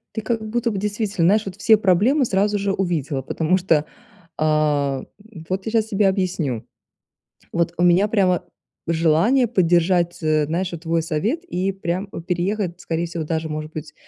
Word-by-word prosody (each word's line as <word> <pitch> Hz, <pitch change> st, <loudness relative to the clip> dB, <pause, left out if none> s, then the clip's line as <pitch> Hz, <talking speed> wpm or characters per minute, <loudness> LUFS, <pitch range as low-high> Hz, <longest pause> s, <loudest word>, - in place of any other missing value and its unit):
Ты 220 Hz, -, -2 dB
как 220 Hz, -1 st, -2 dB
будто 235 Hz, 0 st, 0 dB
бы, 200 Hz, -, -3 dB
действительно, 205 Hz, -4 st, 0 dB
знаешь, 210 Hz, +3 st, +3 dB
вот 195 Hz, -1 st, -7 dB
все 220 Hz, +2 st, +5 dB
проблемы 210 Hz, -, +3 dB
сразу 205 Hz, 0 st, +1 dB
же 200 Hz, 0 st, -1 dB
увидела, 155 Hz, -8 st, -1 dB
потому 160 Hz, +7 st, 0 dB
что, 165 Hz, -5 st, +2 dB, 0.5 s
а, 150 Hz, -3 st, +1 dB, 0.5 s
вот 190 Hz, +1 st, -2 dB
я 220 Hz, -, -3 dB
щас 220 Hz, -1 st, +2 dB
тебе 205 Hz, -1 st, +2 dB
объясню. 180 Hz, -, -1 dB, 0.9 s
Вот 170 Hz, 0 st, 0 dB
у -, -, +3 dB
меня 180 Hz, +3 st, +4 dB
прямо 190 Hz, -5 st, +2 dB, 0.4 s
желание 170 Hz, -, +3 dB
поддержать, 175 Hz, -3 st, +2 dB
э, 155 Hz, -1 st, +2 dB
знаешь, 175 Hz, +4 st, -2 dB
вот 170 Hz, -1 st, -8 dB
твой 165 Hz, 0 st, +1 dB
совет 205 Hz, -, -1 dB
и 190 Hz, -, -1 dB
прям 185 Hz, +1 st, -3 dB, 0.2 s
переехать, 180 Hz, 0 st, -1 dB
скорее 170 Hz, -1 st, -2 dB
всего, 165 Hz, -1 st, -4 dB
даже, 160 Hz, 0 st, -2 dB
может 155 Hz, +1 st, -5 dB
быть, 150 Hz, -1 st, -7 dB
180 Hz, 165 wpm, -21 LUFS, 160-205 Hz, 0.9 s, все